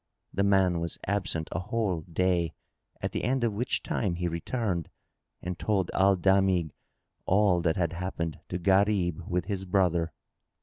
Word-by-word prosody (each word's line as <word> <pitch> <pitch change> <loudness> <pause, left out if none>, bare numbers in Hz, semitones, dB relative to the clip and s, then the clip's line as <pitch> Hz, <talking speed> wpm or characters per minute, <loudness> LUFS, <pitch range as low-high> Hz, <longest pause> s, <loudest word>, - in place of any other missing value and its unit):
The 100 - 0
man 95 -3 +3
was 85 0 -3
absent 95 -5 -1
a - - -1
whole 100 -4 -1
day, 85 0 0 0.5
at - - -1
the - - -3
end 130 +2 +1
of 115 -3 +1
which 120 +5 -1
time 95 -6 -1
he 90 0 -1
returned 85 +1 -2 0.5
and 90 -1 -4
told 100 -4 0
Al 95 +1 +4
Damigh 95 -3 +3 0.6
all 95 -2 +4
that 85 -1 +1
had 85 -2 0
happened 85 -2 -3
to - - -2
Gharib 95 -2 +2
with 90 0 0
his 95 -1 -3
brother. 90 -3 +1
90 Hz, 160 wpm, -28 LUFS, 85-100 Hz, 0.6 s, Al